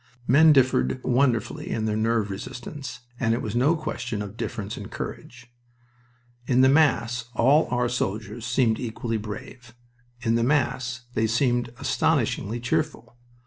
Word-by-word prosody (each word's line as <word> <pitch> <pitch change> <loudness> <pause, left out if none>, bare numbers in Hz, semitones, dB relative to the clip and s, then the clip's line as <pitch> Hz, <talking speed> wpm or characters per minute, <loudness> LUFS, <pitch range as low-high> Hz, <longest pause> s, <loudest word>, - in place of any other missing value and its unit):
Men 155 +6 +6
differed 130 - +3
wonderfully 125 -2 +1
in 110 - -1
their 105 -1 0
nerve 110 -1 +1
resistance, 120 +5 -7 0.2
and 115 -1 +2
it 120 - -3
was 110 0 -4
no 140 +7 +3
question 120 -9 -4
of 105 0 -9
difference 110 -3 -4
in - - -7
courage. 120 0 -8 0.9
In 130 0 +4
the 130 - +6
mass 125 -5 +2
all 140 +7 +4
our 125 0 +1
soldiers 110 -1 -3
seemed 115 -1 +1
equally 115 -1 -3
brave. 115 +3 -8 0.5
In 115 -2 +1
the 115 0 +2
mass 125 -3 0
they 110 -1 +1
seemed 120 +1 +1
astoundingly 115 0 0
cheerful. 120 -1 -2
120 Hz, 145 wpm, -25 LUFS, 110-130 Hz, 0.9 s, Men